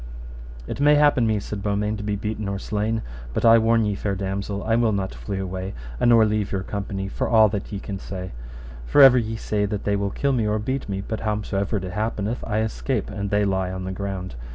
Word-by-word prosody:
It - - -5
may 145 +1 +5
happen 145 -5 +4
me, 110 -1 +1
said 100 0 -6
Beaumains, 105 +1 -1
to - - -5
be 105 0 -1
beaten 105 +1 -3
or 100 - -2
slain, 105 +3 -2 0.3
but - - +1
I 115 0 +8
warn 115 0 +3
you, 105 -1 0
fair 100 0 -2
damosel, 100 +1 -3
I 115 +1 +2
will 115 -2 +2
not 95 -1 -2
flee 100 -2 -5
away, 95 0 -4 0.2
a - - +3
nor 115 -2 +6
leave 105 -1 -1
your 95 -1 -1
company, 100 -1 -4
for - - -2
all 110 -2 +6
that 100 -1 -4
ye 100 - -3
can 100 0 -6
say; 95 -1 -6 0.6
for 145 - +7
ever 130 -2 +8
ye 110 -1 -3
say 105 -1 -1
that 100 0 -3
they 100 - +1
will 100 0 -1
kill 140 +7 0
me 115 -4 +1
or 105 0 +1
beat 130 +3 -3
me, 95 0 -2
but 110 +2 -4
howsomever 105 -1 -1
it 95 - -4
happeneth 110 +2 -2
I 110 0 0
escape, 110 0 -2
and 100 -1 -3
they 105 0 +2
lie 95 -2 0
on 95 0 -5
the 95 - -4
ground. 95 -1 -4
105 Hz, 235 wpm, -23 LUFS, 100-110 Hz, 0.6 s, I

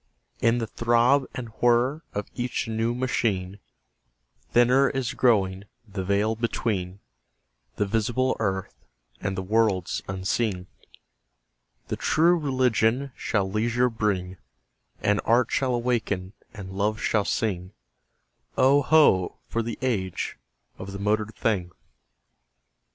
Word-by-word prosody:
In 115 +1 +3
the 115 - -1
throb 120 +4 +2
and 125 -3 -5
whir 120 +5 +3
of 105 0 -3
each 125 -2 -2
new 115 +1 -1
machine 105 -7 -1 0.9
Thinner 125 +3 +4
is 135 -3 -2
growing 100 -5 +2 0.2
the 100 -2 -4
veil 100 +3 +1
between 105 -4 -2 0.7
The 105 - 0
visible 120 +5 0
earth 95 -3 -2 0.5
and 95 -1 -2
the 95 - -2
worlds 105 -3 +1
unseen. 95 0 -1 1.2
The - - -2
True 170 +3 +3
Religion 130 -3 +1
shall 100 -3 -1
leisure 120 +5 +1
bring; 95 -4 -1 0.7
And 105 0 +2
Art 120 +1 +3
shall 130 -2 +1
awaken 110 -6 -1 0.2
and 95 -3 -9
Love 105 +2 0
shall 105 -2 +1
sing: 95 -4 -2 0.9
Oh, 135 +2 +5
ho! 130 - +4
for 115 - 0
the 115 +1 -4
age 95 -8 -2 0.4
of 95 +1 -7
the 100 - -6
motored 105 +2 0
thing! 95 -6 0
110 Hz, 120 wpm, -25 LUFS, 100-120 Hz, 1.2 s, Oh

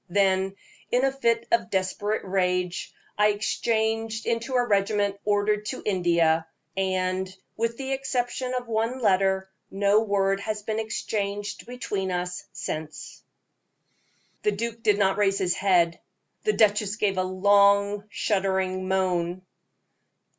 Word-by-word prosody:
Then, 190 0 +2 0.3
in 250 +2 +2
a 270 - +2
fit 235 -4 0
of 345 - +2
desperate 200 +3 -1
rage, 180 -2 -1 0.3
I 210 - +6
exchanged 220 +1 0
into 235 +3 -1
a 245 -1 +3
regiment 200 -1 +1
ordered 210 0 +1
to - - -5
India, 170 -4 +2 0.3
and, 185 -1 0 0.3
with 230 +1 -1
the 270 0 -4
exception 255 -1 -2
of 250 -1 -3
one 230 +2 0
letter, 190 -3 +2 0.2
no 200 +2 +3
word 195 -2 +1
has 210 0 -4
been 220 +1 -2
exchanged 205 -1 -3
between 210 -6 -3
us 180 0 -3
since." 155 0 -6 1.2
The 420 - +1
duke 230 0 -4
did 210 -2 +3
not 195 -1 +2
raise 195 -1 +2
his 180 -1 +1
head. 175 -4 +2 0.5
The 425 - +3
duchess 210 -1 +3
gave 200 -4 0
a - - +2
long, 200 +2 +3
shuddering 190 -2 0
moan. 185 -1 0
200 Hz, 130 wpm, -26 LUFS, 190-220 Hz, 1.2 s, I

